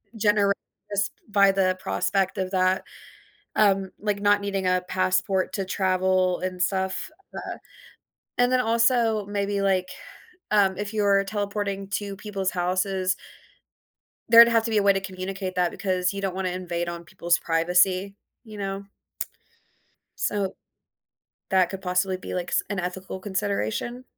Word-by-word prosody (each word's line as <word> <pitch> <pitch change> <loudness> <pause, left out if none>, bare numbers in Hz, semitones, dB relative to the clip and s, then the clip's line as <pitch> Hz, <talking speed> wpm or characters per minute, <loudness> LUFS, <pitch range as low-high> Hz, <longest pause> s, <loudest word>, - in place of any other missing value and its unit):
generate 205 -2 +3 0.4
sp 205 +1 +1 0.2
by 200 -2 +5
the 185 -1 +1
prospect 190 +1 0
of 185 -1 -2
that, 185 0 +2 0.7
um, 195 -2 +3
like 205 -1 -1
not 205 0 +4
needing 195 -2 -1
a 180 0 +2
passport 185 0 +1
to 195 - -2
travel, 185 -1 +1
and 185 -1 -3
stuff, 190 0 -1 0.3
uh, - - -5 0.8
and 245 0 +4
then, 255 - +4
also 230 -2 +2
maybe, 200 0 -1
like, 190 -2 +1 0.6
um, 195 -3 +3
if 205 +1 -4
you're 200 -2 +3
teleporting 200 -1 -3
to 200 -1 -6
people's 195 -2 -3
houses 185 +1 0 1.1
there'd 230 0 +10
have 230 -1 +3
to 230 - -1
be 220 - 0
a 205 - +4
way 200 0 +6
to 195 - -1
communicate 190 0 -5
that 180 -1 +2
because 185 -1 -1
you 200 - -4
don't 195 -2 -2
wanna 190 -1 -1
invade 175 -1 -3
on 170 0 -6
people's 170 0 +1
privacy, 180 +4 +2 0.3
you 215 -2 -10
know? 195 0 -4 1.3
So, 200 -2 -1 0.9
that 185 -2 +4
could 195 -1 -6
possibly 185 +1 0
be, 185 - -7
like, 180 -1 -3
s - - +2
an 200 - -2
ethical 185 +1 -5
consideration. 185 - -2
195 Hz, 145 wpm, -25 LUFS, 185-205 Hz, 1.3 s, there'd